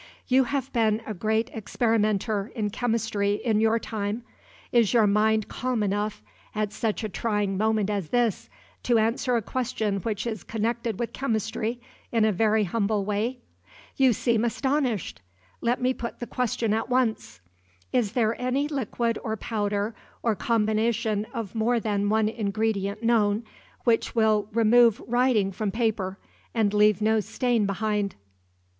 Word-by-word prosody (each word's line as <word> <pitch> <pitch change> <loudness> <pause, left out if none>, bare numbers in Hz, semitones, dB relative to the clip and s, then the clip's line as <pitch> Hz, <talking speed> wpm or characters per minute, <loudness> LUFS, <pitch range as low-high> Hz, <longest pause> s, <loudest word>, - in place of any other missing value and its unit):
"You 260 +1 +4
have 270 0 -3
been 225 -2 +2
a 215 - -4
great 220 +5 0
experimenter 215 -1 0
in 210 -3 -1
chemistry 220 -3 0
in 215 -1 0
your 225 +1 +3
time 215 0 -3 0.5
is 235 -1 +3
your 225 -2 +6
mind 215 +1 +2
calm 250 -3 -1
enough, 205 +1 -2 0.3
at 210 -1 -1
such 225 -1 -2
a 215 - -2
trying 205 -1 -1
moment 215 0 +1
as 200 -6 -2
this, 240 -3 0 0.3
to 240 -2 +2
answer 230 +3 +1
a 230 - 0
question 220 -4 -1
which 210 +1 -3
is 220 -4 -4
connected 230 0 -2
with 235 - -3
chemistry 225 -1 -2 0.3
in 225 -2 +3
a 220 - +3
very 215 +2 +2
humble 205 +1 0
way? 215 +5 -1 0.5
You 265 -2 +5
seem 230 0 +1
astonished. 255 - -1 0.4
Let 240 +2 +1
me 255 +1 +1
put 235 -2 -6
the 240 - -5
question 230 -3 -1
at 225 +3 -1
once. 245 - 0 0.5
Is 230 -4 +1
there 230 -2 +2
any 260 +3 0
liquid 235 -5 -1
or 220 -1 -2
powder, 205 0 -2 0.3
or 230 - +2
combination 220 -1 0
of 230 -6 -5
more 235 +2 +1
than 205 -2 0
one 220 0 +3
ingredient 215 -1 -1
known, 220 -2 +2 0.4
which 230 0 +1
will 215 -2 +2
remove 230 0 +5
writing 240 -5 +2
from 205 +2 -2
paper, 205 -3 -1 0.4
and 215 -3 +2
leave 210 -1 +4
no 220 0 +3
stain 225 0 0
behind?" 205 0 -1
220 Hz, 150 wpm, -26 LUFS, 210-235 Hz, 0.5 s, your